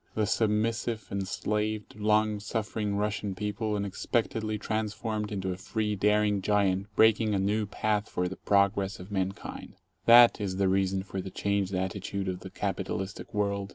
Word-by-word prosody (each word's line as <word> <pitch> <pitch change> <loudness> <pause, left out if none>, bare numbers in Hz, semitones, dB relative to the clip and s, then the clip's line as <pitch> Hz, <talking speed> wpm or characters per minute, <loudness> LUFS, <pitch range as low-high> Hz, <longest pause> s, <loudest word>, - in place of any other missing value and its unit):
The 110 - +2
submissive, 110 +1 0
enslaved, 105 +2 -2
long 105 0 +2
suffering 105 -1 -2
Russian 105 -1 -1
people 105 +2 -2
unexpectedly 110 +2 -1
transformed 110 0 -2
into 95 -2 -2
a 90 - -4
free, 105 +2 -2
daring 105 0 +2
Giant 100 -1 +1
breaking 110 -1 +4
a - - +1
new 105 +2 0
path 105 0 -1
for 90 0 -1
the 95 - -5
progress 100 +1 +1
of 90 +3 -10
mankind 95 0 -4 0.2
— - - -44
that 120 -1 +8
is 95 -2 -2
the 100 -1 +2
reason 95 0 +1
for 95 -1 -5
the 95 - -6
15 - - -19
changed 100 -1 +1
attitude 95 +1 -3
of 90 -1 -2
the - - -9
capitalistic 95 +1 -4
world. 100 -1 -1
105 Hz, 160 wpm, -29 LUFS, 95-110 Hz, 0.2 s, that